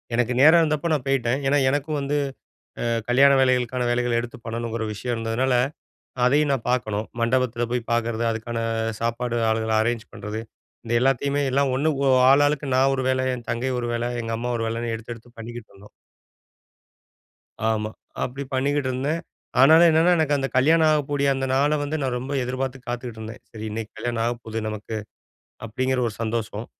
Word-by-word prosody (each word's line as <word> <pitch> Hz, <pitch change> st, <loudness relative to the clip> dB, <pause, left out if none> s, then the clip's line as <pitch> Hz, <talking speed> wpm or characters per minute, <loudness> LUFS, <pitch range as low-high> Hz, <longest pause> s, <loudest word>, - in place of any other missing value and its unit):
எனக்கு 125 Hz, +1 st, +1 dB
நேரம் 160 Hz, +4 st, +8 dB
இருந்தப்ப 155 Hz, +1 st, 0 dB
நான் 140 Hz, -4 st, -1 dB
போய்ட்டேன். 130 Hz, -1 st, +1 dB
ஏன்னா, 145 Hz, +2 st, +3 dB
எனக்கும் 145 Hz, +2 st, -1 dB
வந்து 140 Hz, +1 st, -1 dB, 0.7 s
அ 115 Hz, 0 st, 0 dB
கல்யாண 135 Hz, +3 st, +6 dB
வேலைகளுக்கான 125 Hz, -1 st, +1 dB
வேலைகள 120 Hz, 0 st, +1 dB
எடுத்து 120 Hz, 0 st, -8 dB
பண்ணணுங்கிற 115 Hz, 0 st, -3 dB
விஷயம் 120 Hz, +4 st, -3 dB
இருந்ததுனால, 115 Hz, +3 st, 0 dB, 0.7 s
அதையும் 145 Hz, +3 st, +3 dB
நான் 130 Hz, -4 st, -2 dB
பார்க்கணும். 110 Hz, -4 st, -1 dB
மண்டபத்தில 120 Hz, 0 st, +1 dB
போய் 125 Hz, -2 st, -2 dB
பார்க்கறது, 115 Hz, 0 st, 0 dB
அதுக்கான 115 Hz, +1 st, -4 dB, 0.4 s
சாப்பாடு 120 Hz, +1 st, -1 dB
ஆளுகள 110 Hz, 0 st, 0 dB
அரேஞ்ச் 115 Hz, 0 st, -2 dB
பண்ணுறது 105 Hz, +2 st, -5 dB, 0.5 s
இந்த 115 Hz, -, -3 dB
எல்லாத்தையுமே 135 Hz, +2 st, +1 dB
எல்லாம் 140 Hz, 0 st, +2 dB
1 145 Hz, +4 st, +1 dB, 0.2 s
ஒ -, -, +4 dB, 0.2 s
ஆளாளுக்கு 145 Hz, +1 st, +3 dB
நான் 135 Hz, +1 st, +4 dB
ஒரு 130 Hz, -, -1 dB
வேல, 130 Hz, 0 st, +1 dB
என் 120 Hz, -2 st, -10 dB
தங்கை 125 Hz, +3 st, -1 dB
ஒரு 120 Hz, -, -2 dB
வேல, 120 Hz, 0 st, -1 dB, 0.2 s
எங்க 115 Hz, 0 st, -4 dB
அம்மா 120 Hz, +1 st, -3 dB
ஒரு 115 Hz, -, -2 dB
வேலன்னு 115 Hz, 0 st, -3 dB
எடுத்து 115 Hz, +1 st, -8 dB
எடுத்து 115 Hz, +1 st, -16 dB
பண்ணிக்கிட்டு 115 Hz, 0 st, -8 dB
இருந்தோம். 100 Hz, +1 st, -16 dB, 1.8 s
ஆமா. 110 Hz, -1 st, -1 dB, 0.3 s
அப்படி 135 Hz, +3 st, -4 dB
பண்ணிக்கிட்டே 140 Hz, +1 st, 0 dB
இருந்தேன். 140 Hz, +6 st, -2 dB, 0.4 s
ஆனாலும் 160 Hz, +5 st, +8 dB
என்னன்னா, 165 Hz, +3 st, +4 dB
எனக்கு 150 Hz, -2 st, +2 dB
அந்த 135 Hz, -, -1 dB
கல்யாணமாகக் 155 Hz, +1 st, +4 dB
கூடிய 140 Hz, -1 st, +1 dB
அந்த 135 Hz, 0 st, -2 dB
நாள 140 Hz, +3 st, +3 dB
வந்து 145 Hz, +2 st, -3 dB
நான் 130 Hz, -2 st, -1 dB
ரொம்ப 130 Hz, +3 st, -6 dB
எதிர்பார்த்து 130 Hz, +1 st, -3 dB
காத்துக்கிட்டு 120 Hz, -2 st, -5 dB
இருந்தேன். 110 Hz, +1 st, -8 dB
"சரி, 110 Hz, -1 st, -7 dB
இன்னைக்கு 110 Hz, 0 st, -5 dB
கல்யாணம் 120 Hz, -2 st, -2 dB
ஆகப்போகுது 115 Hz, -2 st, -3 dB
நமக்கு!" 110 Hz, +1 st, -5 dB, 0.7 s
அப்படிங்கிற 130 Hz, +3 st, -1 dB
ஒரு 110 Hz, -, -5 dB
சந்தோஷம். 110 Hz, -1 st, -3 dB
125 Hz, 165 wpm, -24 LUFS, 115-135 Hz, 1.8 s, நேரம்